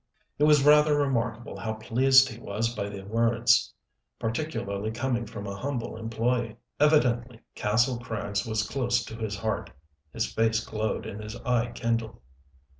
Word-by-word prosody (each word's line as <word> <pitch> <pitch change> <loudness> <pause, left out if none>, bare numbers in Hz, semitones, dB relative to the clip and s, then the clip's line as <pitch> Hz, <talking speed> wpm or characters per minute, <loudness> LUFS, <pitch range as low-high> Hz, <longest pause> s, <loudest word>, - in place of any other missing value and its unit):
It 150 - +5
was 150 -2 +5
rather 150 0 +6
remarkable 120 -5 -1
how 110 -1 -3
pleased 130 +4 +5
he 115 -3 -8
was 115 +2 -2
by 100 -3 -3
the 100 -1 -8
words 115 +3 +2 0.5
particularly 110 -5 -3
coming 120 0 -2
from 105 -1 -7
a 100 0 -5
humble 125 +2 -4
employee. 115 0 -1 0.2
Evidently 125 -6 +2
Kastle 120 +4 +1
Krags 100 -4 -3
was 110 -1 -1
close 120 -3 0
to 110 - -8
his 110 -3 -3
heart. 110 +2 -2 0.4
His 115 +8 -1
face 115 0 0
glowed 110 0 -2
and 105 - -6
his 105 +1 -7
eye 120 -1 0
kindled. 115 - -2
115 Hz, 150 wpm, -27 LUFS, 110-125 Hz, 0.5 s, rather